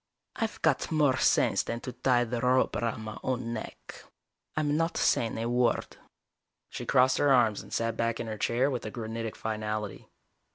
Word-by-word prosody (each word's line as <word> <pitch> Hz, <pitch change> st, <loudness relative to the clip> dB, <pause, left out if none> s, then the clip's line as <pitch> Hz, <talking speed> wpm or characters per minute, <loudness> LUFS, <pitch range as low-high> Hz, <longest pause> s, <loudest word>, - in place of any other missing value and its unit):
"I've 225 Hz, -1 st, -3 dB
got 160 Hz, -1 st, +2 dB
more 145 Hz, -5 st, +3 dB
sense -, -, +3 dB
than 115 Hz, -, -4 dB
to 125 Hz, -, -5 dB
tie 125 Hz, -2 st, +2 dB
the 120 Hz, 0 st, -3 dB
rope 130 Hz, +1 st, +2 dB
around 115 Hz, -1 st, -2 dB
my 110 Hz, -1 st, -7 dB
own 125 Hz, -2 st, -2 dB
neck. 110 Hz, -, -8 dB, 0.5 s
I'm 150 Hz, -1 st, +1 dB
not 165 Hz, +1 st, 0 dB
saying 115 Hz, -, +1 dB
a 115 Hz, +1 st, -2 dB
word." 120 Hz, 0 st, 0 dB, 0.7 s
She -, -, -7 dB
crossed 130 Hz, +1 st, +4 dB
her 145 Hz, -, +4 dB
arms 115 Hz, -5 st, +4 dB
and -, -, -14 dB
sat 115 Hz, 0 st, -1 dB
back 115 Hz, 0 st, 0 dB
in -, -, -3 dB
her 110 Hz, -2 st, -5 dB
chair 130 Hz, +4 st, +1 dB
with 125 Hz, -, -3 dB
a 110 Hz, -, -4 dB
granitic 115 Hz, 0 st, -5 dB
finality. 110 Hz, -1 st, -4 dB
120 Hz, 180 wpm, -29 LUFS, 115-130 Hz, 0.7 s, crossed